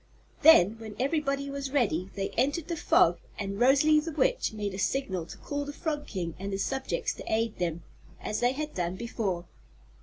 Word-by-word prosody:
Then, 225 - +7
when 220 -2 -8
everybody 275 0 0
was 275 -1 -4
ready, 200 - +1
they 195 0 -2
entered 285 +7 0
the 340 - -1
Fog 175 - +4 0.2
and 200 0 -4
Rosalie 285 +5 +5
the 325 +2 -4
Witch - - +1
made 205 -2 -4
a 190 - -5
signal 190 -7 -1
to - - -10
call 285 0 -4
the 285 - -5
Frog 295 -1 -3
King 175 -5 -4
and 195 +1 -4
his 195 0 -1
subjects 265 -1 -2
to - - -8
aid 225 0 0
them, 170 -1 -2 0.4
as 215 - -3
they 245 +1 +2
had 300 +2 -4
done 175 0 -2
before. 195 -5 -3
240 Hz, 190 wpm, -29 LUFS, 195-285 Hz, 0.4 s, Then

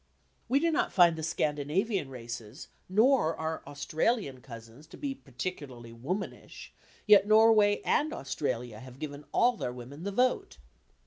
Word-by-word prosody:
We 270 +3 +4
do 335 +2 +1
not 310 - 0
find 175 -3 +5
the 160 - -6
Scandinavian 155 - -1
races 120 -1 -8 0.2
nor 215 - +3
our 160 0 -3
Australian 145 - -1
cousins 115 +4 -12
to - - -13
be 280 -2 -3
particularly 130 - -7
womanish, 175 - -6 0.3
yet 205 -1 +6
Norway 215 -1 +5
and 305 +1 +2
Australia 125 -4 -4
have 130 +1 -12
given 145 0 -7
all 245 +1 +3
their 125 - -3
women 125 +5 -10
the 200 +3 -3
vote. 250 - 0
155 Hz, 140 wpm, -29 LUFS, 130-210 Hz, 0.3 s, yet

